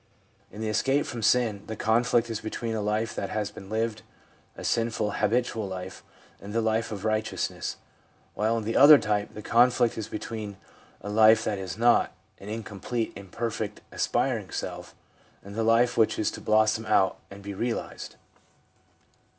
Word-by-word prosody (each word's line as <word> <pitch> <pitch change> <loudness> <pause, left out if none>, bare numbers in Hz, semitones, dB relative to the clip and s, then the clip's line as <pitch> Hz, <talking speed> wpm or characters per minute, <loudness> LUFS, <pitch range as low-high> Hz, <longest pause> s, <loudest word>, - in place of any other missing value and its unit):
In 105 - -8
the 110 - -2
escape 135 +6 +1
from 120 - -5
sin 110 -2 +2
the 110 - -4
conflict 115 +2 +2
is 110 - -3
between 115 +1 -4
a 110 - -2
life 105 +2 -1
that 100 - -4
has 105 -1 -2
been 95 - -11
lived 110 0 -1 0.3
— - - -33
a - - -8
sinful, 115 -2 0
habitual 110 0 0
life 95 -1 -7 0.2
— - - -28
and 100 +1 -8
the 115 - +1
life 110 0 0
of 105 -1 -5
righteousness; 110 0 -2 0.6
while 110 +2 +1
in 115 - -3
the 115 +2 -2
other 145 +2 +10
type 105 -4 -1
the 105 - -8
conflict 120 0 +3
is 110 - -4
between 110 -2 -6 0.4
a 100 - -6
life 110 +1 +6
that 105 -3 -2
is 95 -2 -5
not 120 +1 +3
— - - -35
an 100 - -8
incomplete, 110 +1 -4
imperfect, 105 +2 -4
aspiring - - 0
self - - -6 0.2
— - - -32
and 100 - -10
the 115 - -2
life 115 +2 +3
which 110 -2 +3
is 110 - 0
to - - -8
blossom 110 +1 +2
out 95 -3 +3
and 100 0 -11
be 100 0 -5
realised. 115 +4 -4
110 Hz, 180 wpm, -27 LUFS, 105-115 Hz, 0.6 s, other